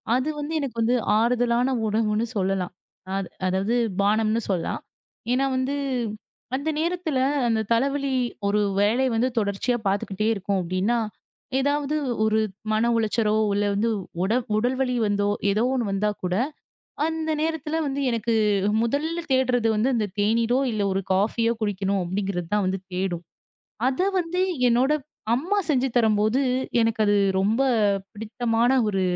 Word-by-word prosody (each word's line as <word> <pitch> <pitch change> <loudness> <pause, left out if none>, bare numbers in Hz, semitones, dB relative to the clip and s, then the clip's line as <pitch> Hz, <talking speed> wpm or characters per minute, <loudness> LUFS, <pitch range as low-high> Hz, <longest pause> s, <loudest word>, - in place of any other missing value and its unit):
அது 260 +4 0
வந்து 295 +2 -4
எனக்கு 275 -5 -4
வந்து 235 +2 +3 0.2
ஆறுதலான 240 +1 +2 0.2
உணவுன்னு 215 +1 +1
சொல்லலாம். 190 -2 -1 0.4
அத் 195 -2 -3 0.2
அதாவது 190 +5 0 0.3
பானம்ன்னு 215 +2 +2
சொல்லலாம். 180 -4 -1 0.5
ஏன்னா 260 +2 +2
வந்து 260 +2 -1 0.8
அந்த 285 +4 -2
நேரத்துல 335 -3 -1 0.3
அந்தத் 220 -2 0
தலைவலி 275 +3 0 0.3
ஒருவேளை 205 +4 +2
வந்து 235 +3 +2
தொடர்ச்சியா 205 +4 0
பாத்துக்கிட்டே 200 +1 -1
இருக்கும். 195 -1 -1
அப்படின்னா 185 +7 0 0.6
ஏதாவது 285 +2 0 0.3
ஒரு 220 0 +2 0.3
மன 220 +2 +2
உளைச்சலோ 220 -1 +1 0.2
இல்ல 205 +1 +1 0.6
உட 195 +4 +1 0.2
உடல் 245 +4 +1
வலி 250 -1 0
வந்தோ 205 0 +1 0.2
ஏதோ 210 +3 +1
ஒண்ணு 240 -6 -1
வந்தா 200 +2 +1
கூட 180 0 0 0.7
அந்த 320 0 -2
நேரத்துல 320 0 -1
வந்து 280 0 -2
எனக்கு 230 0 0 0.5
முதல்ல 310 +8 -1
தேடுறது 250 -3 +2
அந்தத் 215 -4 0
தேனீரோ 230 +4 +2
இல்ல 215 -2 -1
ஒரு 190 - 0
காஃப்பியோ 225 +4 +2
குடிக்கணும் 200 -2 0
அப்படிங்கறது 185 -1 -3
தான் 190 -2 +1 0.2
தேடும். 180 -2 -2 0.6
அத 265 +3 -2 0.2
வந்து 350 +1 -2 0.3
என்னோட 250 +4 +3 0.4
அம்மா 350 +12 0
செஞ்சு 270 -2 +2
தரும்போது 215 +2 +2 0.4
எனக்கு 225 -1 +1
அது 205 - +3 0.3
ரொம்ப 215 +6 +1 0.5
பிடித்தமான 230 +3 0 0.2
ஒரு 195 -2 0
225 Hz, 130 wpm, -24 LUFS, 205-260 Hz, 0.8 s, வந்து